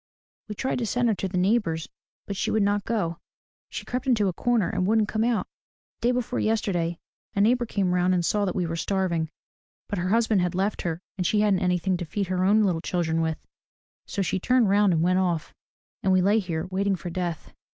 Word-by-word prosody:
We 210 - -4
tried 260 +5 -1
to 235 - -1
send 245 +2 +1
her - - +3
to 195 - -3
the 185 0 -3
neighbor's 180 -4 +1 0.4
but 200 - -4
she - - -1
would 215 -1 +2
not 205 0 +1
go. 170 -8 -1 0.5
She - - -6
crept 250 +1 -3
into 220 -6 +3
a - - -3
corner 235 0 +1
and 185 -3 -1
wouldn't 220 0 +3
come 220 0 0
out. 235 -1 +1 0.6
Day 240 - +2
before 250 -1 -1
yesterday 180 -6 0 0.4
a 200 - +2
neighbor 240 +3 +3
came 190 -4 0
round 180 +1 +2
and 175 -1 0
saw 205 +2 +1
that 185 - -2
we 180 - 0
were 165 0 -3
starving, 170 -3 -1 0.6
but 205 - -3
her 180 +1 -1
husband 220 -2 +3
had 180 -1 -1
left 195 +3 0
her 165 0 -3 0.2
and 180 - +1
she 210 - +2
hadn't 205 -3 +3
anything 180 0 +1
to 175 - -4
feed 200 +5 -2
her 185 0 0
own 210 +3 +4
little 175 -5 +1
children 165 -2 0
with. 160 -1 -2 0.6
So 200 - -1
she 190 +1 -1
turned 250 +1 +3
round 200 0 +4
and 165 -1 +2
went 185 +1 +3
off. 175 -4 -1 0.5
And 190 - +1
we 185 -1 +4
lay 205 +4 +4
here 170 -4 -3
waiting 195 +1 +1
for 175 0 -6
death." 175 -2 -4
190 Hz, 225 wpm, -26 LUFS, 175-215 Hz, 0.6 s, own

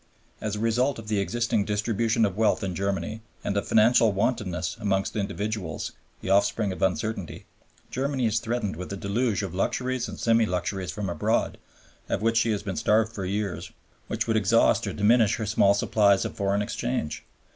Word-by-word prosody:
As 105 -1 -2
a - - -4
result 120 +5 +1
of 110 -1 -9
the 105 -2 +1
existing 115 +1 0
distribution 110 +2 +1
of 100 -3 -2
wealth 110 0 +2
in 95 -2 -2
Germany, 100 +4 -2 0.2
and 100 - -2
of 100 0 -1
financial 110 0 +5
wantonness 100 -5 -1
amongst 95 -3 -1
individuals, 100 -4 -3 0.3
the - - -5
offspring 100 +1 +2
of 90 - -7
uncertainty, 95 +1 -2 0.5
Germany 135 -1 -1
is 110 0 +2
threatened 115 -7 -2
with 90 +2 -6
a 100 - -4
deluge 105 +1 0
of 95 -3 -5
luxuries 125 +6 -1
and 105 - -8
semi 115 -1 +3
luxuries 90 0 -2
from 100 +2 -4
abroad, 85 -4 0 0.5
of - - -1
which 115 0 +2
she 115 0 +3
has 105 -2 -1
been 95 -3 -4
starved 110 +1 +2
for 100 -4 -4
years, 100 0 -3 0.4
which - - -1
would 115 -1 +1
exhaust 100 -3 +3
or - - -3
diminish 110 +1 +4
her 110 - -3
small 100 -1 +4
supplies 100 -1 +3
of - - -4
foreign 100 +1 0
exchange. 120 -8 -3
105 Hz, 180 wpm, -26 LUFS, 100-115 Hz, 0.5 s, financial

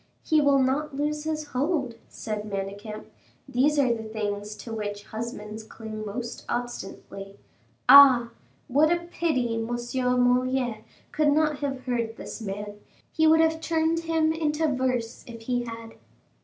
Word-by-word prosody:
"He 310 -1 +3
will 285 -1 +4
not 270 +3 0
lose 300 +1 -2
his 310 -1 -2
hold," 275 -1 -1 0.2
said 215 -1 -5
Manicamp; 200 +2 -5 0.4
"these 275 +3 +2
are 260 -4 +4
the 225 - -5
things 210 -1 -4
to 230 - -8
which 205 -2 -4
husbands 220 -1 -6
cling 220 0 -8
most 230 +3 -5
obstinately. 200 -4 -5 0.5
Ah! 255 -3 +9 0.4
what 295 +5 +3
a 345 0 +2
pity 255 -9 0
M. 225 0 -2
Moliere 250 -1 +1 0.3
could 300 -1 +2
not 300 -1 +2
have 275 -2 -3
heard 235 -3 -1
this - - -8
man; 205 0 -6 0.3
he 320 0 +3
would 320 +1 +6
have 320 0 +2
turned 325 0 +1
him 325 -1 +1
into 320 0 0
verse 255 -3 -1
if 230 -1 -9
he 245 +1 -1
had." 230 -1 -8
250 Hz, 145 wpm, -26 LUFS, 220-295 Hz, 0.5 s, Ah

